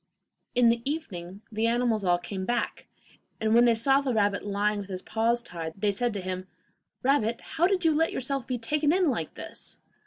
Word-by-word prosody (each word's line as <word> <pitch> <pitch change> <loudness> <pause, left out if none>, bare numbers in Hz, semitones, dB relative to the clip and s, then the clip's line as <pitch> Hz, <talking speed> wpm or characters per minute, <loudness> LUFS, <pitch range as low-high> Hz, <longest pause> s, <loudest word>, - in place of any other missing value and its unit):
In 245 -1 +6
the 230 0 +2
evening 205 - -5
the 220 +1 +1
animals 235 -3 +1
all 175 -1 +3
came 190 +2 -5
back, 240 +4 -2 0.5
and 220 0 +1
when 240 +1 +6
they 235 -1 +5
saw 270 +5 +4
the 260 -4 -1
rabbit 205 -1 +1
lying 205 +1 0
with 200 -1 -7
his 185 -1 -4
paws 235 +2 +1
tied, 165 -5 -6
they 205 +1 +1
said 240 +4 0
to 200 - -2
him: 185 0 -4 0.6
'Rabbit, 235 -4 +2
how 340 +2 +1
did 370 -3 0
you 320 - +5
let 325 +2 +2
yourself 265 0 -2
be 255 - -1
taken 295 +6 +1
in 360 -3 +3
like 165 -10 -4
this? - - -9
230 Hz, 205 wpm, -27 LUFS, 200-265 Hz, 0.6 s, In